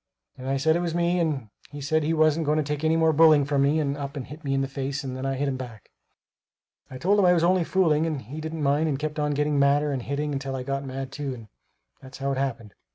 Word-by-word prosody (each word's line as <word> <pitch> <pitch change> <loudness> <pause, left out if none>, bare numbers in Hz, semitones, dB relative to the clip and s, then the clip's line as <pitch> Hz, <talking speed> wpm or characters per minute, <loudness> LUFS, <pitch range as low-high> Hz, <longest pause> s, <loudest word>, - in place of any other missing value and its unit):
and 130 +1 -6
I 135 - +1
said 160 +4 +2
it - - +1
was 170 -1 -2
me, 175 +1 +1
and 145 -9 -1 0.2
he 145 - -9
said 155 +3 +1
he 155 +2 0
wasn't 155 -1 +2
going 150 +1 +2
to 155 - +2
take 150 +1 -4
any 160 +1 +3
more 160 -1 +3
bullying 155 -2 +6
from 140 -1 +1
me 145 +3 +3
and 140 -2 -1
up 140 0 -6
and 130 - -5
hit 150 +4 -11
me 135 -1 -1
in 135 - +1
the 135 - -1
face 140 +1 -4
and 130 -1 -5
then 130 +1 -3
I 135 - -1
hit 140 +2 -1
him 135 -1 -1
back. 120 -5 -10 1.0
I 130 - -8
told 195 +9 +2
him 195 - +4
I 180 - +6
was 170 -2 +2
only 180 0 +3
fooling, 165 -3 +2
but 140 -4 -5
he 145 +8 -7
didn't 160 0 -4
mind 145 +3 +2
and 140 - -1
kept 155 +1 -4
on 150 -1 0
getting 150 0 +1
madder 145 +1 +3
and 135 -2 -2
hitting 140 +2 -2
till 135 -1 -4
I 130 - -4
got 140 +1 -3
mad 135 -1 -5
too 140 -3 -4
and 115 -3 -13 0.5
that's 130 0 -11
how 140 0 -2
it 135 - -1
happened. 115 -6 -3
145 Hz, 285 wpm, -25 LUFS, 135-155 Hz, 1.0 s, bullying